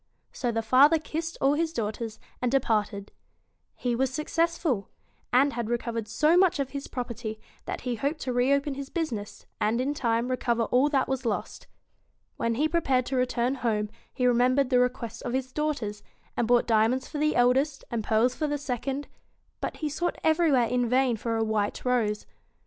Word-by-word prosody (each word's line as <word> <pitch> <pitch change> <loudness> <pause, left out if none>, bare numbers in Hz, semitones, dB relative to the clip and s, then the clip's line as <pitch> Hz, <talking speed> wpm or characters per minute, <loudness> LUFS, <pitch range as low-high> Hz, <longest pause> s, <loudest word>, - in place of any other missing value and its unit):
So 245 -2 -2
the 225 0 -1
father 275 +8 +6
kissed 320 +2 -4
all 275 +1 +4
his 320 +2 0
daughters, 220 -4 -4 0.2
and 250 -1 +1
de 270 - +4
parted. 210 -4 -1 0.6
He 245 -1 -1
was 265 +2 +1
successful; 305 - 0 0.4
and 275 +3 +4
had 235 -2 -3
recovered 230 -2 -2
so 300 +10 +3
much 365 -2 +4
of 270 -1 -2
his 280 -1 -5
property 235 -3 -5 0.3
that - - -4
he 250 -1 -2
hoped 285 +7 -1
to 255 - -2
reopen 275 +3 +2
his 275 0 -6
business, 240 - -4
and 220 +3 +1
in 270 +3 0
time 235 -3 0
recover 235 -2 +1
all 255 +5 +3
that 275 -3 +1
was 265 -1 -2
lost. 225 -4 -3 0.7
When 230 0 0
he 300 +6 +2
prepared 270 -7 +1
to 265 - -3
return 250 0 +1
home, 220 -5 -1 0.2
he 255 - -4
remem 250 +1 +4
bered 275 -2 +3
the 250 - +5
requests 245 -2 -1
of 240 - -4
his 260 0 -2
daughters, 280 -9 -2 0.3
and 235 - 0
bought 240 0 +4
diamonds 230 +3 +2
for 300 - -5
the 305 +1 +2
eldest 265 +4 +2
and 230 -2 -1
pearls 225 +4 +2
for 305 +3 -2
the 290 0 -1
second; 275 +1 -3 0.5
but - - -4
he 310 - -2
sought 345 +4 -2
everywhere 315 -6 +4
in 245 0 0
vain 255 -1 +3
for 225 +1 -2
a 225 - +1
white 215 0 -1
rose. 225 -4 +1
250 Hz, 190 wpm, -27 LUFS, 230-280 Hz, 0.7 s, father